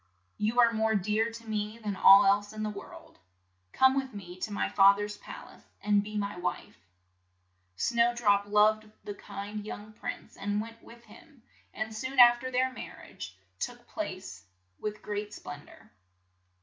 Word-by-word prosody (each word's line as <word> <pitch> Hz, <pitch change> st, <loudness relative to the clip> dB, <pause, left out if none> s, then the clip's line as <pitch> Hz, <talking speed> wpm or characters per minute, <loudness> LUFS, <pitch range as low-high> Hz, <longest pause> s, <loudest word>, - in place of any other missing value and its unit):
"You 220 Hz, +4 st, +1 dB
are 235 Hz, -1 st, +6 dB
more 220 Hz, 0 st, +1 dB
dear 215 Hz, +4 st, +1 dB
to 230 Hz, 0 st, -11 dB
me 215 Hz, 0 st, -3 dB
than 210 Hz, -3 st, -4 dB
all 195 Hz, +1 st, +8 dB
else 205 Hz, +1 st, +2 dB
in 215 Hz, 0 st, -4 dB
the 215 Hz, -, -2 dB
world. 200 Hz, -, -12 dB, 0.5 s
Come 265 Hz, 0 st, +4 dB
with 265 Hz, -3 st, -2 dB
me 180 Hz, -3 st, -8 dB
to 210 Hz, -, -4 dB
my 205 Hz, -, -1 dB
fath 200 Hz, 0 st, +6 dB
er's 205 Hz, 0 st, -4 dB
pal -, -, -10 dB
ace -, -, -19 dB, 0.2 s
and 205 Hz, -1 st, +2 dB
be 215 Hz, 0 st, -6 dB
my 200 Hz, 0 st, -2 dB
wife." 150 Hz, -, -5 dB, 0.9 s
Snow 235 Hz, -, +2 dB
drop 205 Hz, -4 st, +2 dB
loved 215 Hz, +1 st, +3 dB
the 205 Hz, -, -5 dB
kind 200 Hz, +1 st, -7 dB
young 215 Hz, 0 st, -8 dB
prince, -, -, -7 dB
and 205 Hz, +1 st, -2 dB
went 230 Hz, +1 st, -7 dB
with 235 Hz, 0 st, -15 dB
him 260 Hz, 0 st, -18 dB, 0.3 s
and 220 Hz, 0 st, -5 dB
soon 260 Hz, +4 st, -5 dB
af 240 Hz, 0 st, +9 dB
ter 255 Hz, +1 st, -5 dB
their 255 Hz, +1 st, +1 dB
mar -, -, -8 dB
riage 90 Hz, -1 st, -10 dB, 0.2 s
took 240 Hz, 0 st, -5 dB
place 190 Hz, -, -6 dB, 0.4 s
with 210 Hz, 0 st, -5 dB
great 210 Hz, 0 st, -4 dB
splen 145 Hz, 0 st, -9 dB
dor. -, -, -18 dB
210 Hz, 175 wpm, -29 LUFS, 205-230 Hz, 0.9 s, af